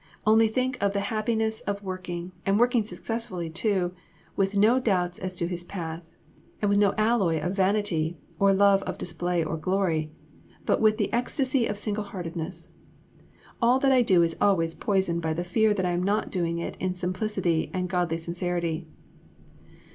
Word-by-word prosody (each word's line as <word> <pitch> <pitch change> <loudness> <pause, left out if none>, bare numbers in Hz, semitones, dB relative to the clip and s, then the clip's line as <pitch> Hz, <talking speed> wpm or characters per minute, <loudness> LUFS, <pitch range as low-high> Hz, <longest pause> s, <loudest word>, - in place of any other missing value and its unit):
Only 220 +1 +5
think 255 +3 -1
of 200 0 +1
the 200 - 0
happiness 220 0 0
of 200 0 -4
working, 185 -2 -5
and 195 +1 +2
working 240 -1 +3
successfully 210 -6 -4
too, 190 +2 +1
and 175 0 -3 0.4
with 195 +1 0
no 220 +6 +5
doubts 180 -7 0
as 185 -1 -4
to 170 -1 -1
His 175 -1 -4
path, 165 -2 -6 0.5
and 205 - +1
with 200 0 +3
no 200 -1 +3
alloy 215 -7 +2
of 175 +5 -2
vanity 190 -5 +1 0.2
or 200 0 +5
love 200 0 +5
of - - -5
display 175 0 -1
or 160 +1 -3
glory, 165 -3 0 0.6
but - - +2
with 215 -1 +4
the 205 - -1
ecstasy 255 +1 +1
of 205 - -3
single 210 0 -3
heartedness! 170 -2 -6 0.9
All 240 +2 +5
that 270 0 +3
I 255 -1 +5
do 185 -7 +4
is 165 -1 0
always 165 -5 +3
poisoned 190 -4 0
by 160 -1 -1
the 175 +2 -2
fear 215 +5 +2
that 195 -3 0
I 180 - +1
am 175 0 0
not 205 +3 0
doing 170 -3 -1
it 170 - -5
in 185 -1 -1
simplicity 185 -2 -1
and 180 -1 -2
godly 175 -2 0
sincerity." 170 -1 -3
190 Hz, 180 wpm, -26 LUFS, 175-215 Hz, 0.9 s, Only